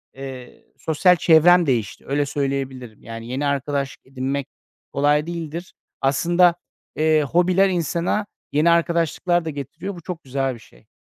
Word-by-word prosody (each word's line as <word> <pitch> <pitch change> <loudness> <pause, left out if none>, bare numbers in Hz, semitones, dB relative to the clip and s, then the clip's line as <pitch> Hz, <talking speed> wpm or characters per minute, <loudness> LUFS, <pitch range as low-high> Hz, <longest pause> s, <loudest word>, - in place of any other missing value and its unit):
eee, 130 -2 -9
sosyal 170 +3 +3
çevrem 175 +2 +5
değişti. 120 -8 -1
Öyle, 145 +1 +1
söyleyebilirim. 135 -5 -4
Yani, 115 0 -8
yeni 130 +4 -2
arkadaşlık 140 0 -2
edinmek 135 +1 -3 0.5
kolay 145 +2 +2
değildir. 170 0 -6 0.3
Aslında, 170 +6 +3 0.4
eee, 155 -1 +3
hobiler 180 +6 +3
insana 175 +3 -1 0.3
yeni 150 +4 +3
arkadaşlıklar 170 +1 +1
da - - -2
getiriyor. 155 +7 -6
Bu 170 - -10
çok 170 0 -7
güzel 135 0 -1
bir 115 - -11
şey. - - -21
150 Hz, 135 wpm, -22 LUFS, 135-170 Hz, 0.5 s, çevrem